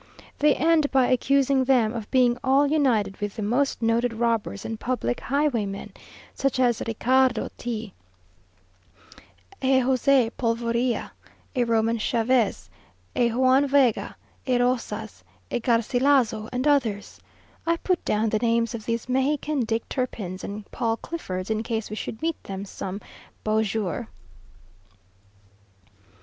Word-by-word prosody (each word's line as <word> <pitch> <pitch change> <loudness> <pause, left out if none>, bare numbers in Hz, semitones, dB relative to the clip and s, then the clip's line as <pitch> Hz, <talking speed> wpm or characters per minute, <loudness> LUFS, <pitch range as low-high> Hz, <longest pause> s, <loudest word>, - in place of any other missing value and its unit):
They 295 0 +4
end 320 -2 +3
by 265 -2 +3
accusing 275 +1 +3
them 250 -4 +3
of 225 -3 -6
being 250 -2 +3
all 270 +2 +4
united 250 -10 +1
with 205 -1 -3
the 215 - -4
most 245 +3 0
noted 230 +1 +1
robbers 225 - -1
and 225 -1 -4
public 240 - -2
highwaymen, 240 -8 -1 0.4
such 275 -1 -1
as 240 -3 +2
a - - -3
Ricardo 250 +1 +2
Tea, 225 -4 -5 1.7
a 265 0 +3
Jose 255 -1 +3
Polvorilla, 235 +1 0 0.4
a 250 - +2
Roman 230 0 +1
Chavez, 225 - +1 0.5
a 235 -1 +2
Juan 260 +3 +3
Vega, 265 -5 +2 0.3
a 250 -1 +3
Rosas, 235 - -2 0.3
a - - 0
Garcilazo, 235 -1 +2
and 255 +3 -1
others. 235 -9 0 0.5
I 335 0 +2
put 365 0 -1
down 215 +1 +1
the 215 - 0
names 230 -1 +1
of 220 -2 -7
these 230 0 -2
Mexican 275 +3 0
Dick 225 0 -2
Turpins 205 -8 -4
and 205 +1 -6
Paul 225 -1 -1
Cliffords, 190 - -5
in 220 0 0
case 225 -2 -3
we - - -3
should 220 +3 -6
meet 330 -1 -2
them 195 0 -5
some 195 0 -6 0.4
beau 215 0 +2
jour. 220 0 -2
235 Hz, 135 wpm, -25 LUFS, 220-265 Hz, 1.7 s, They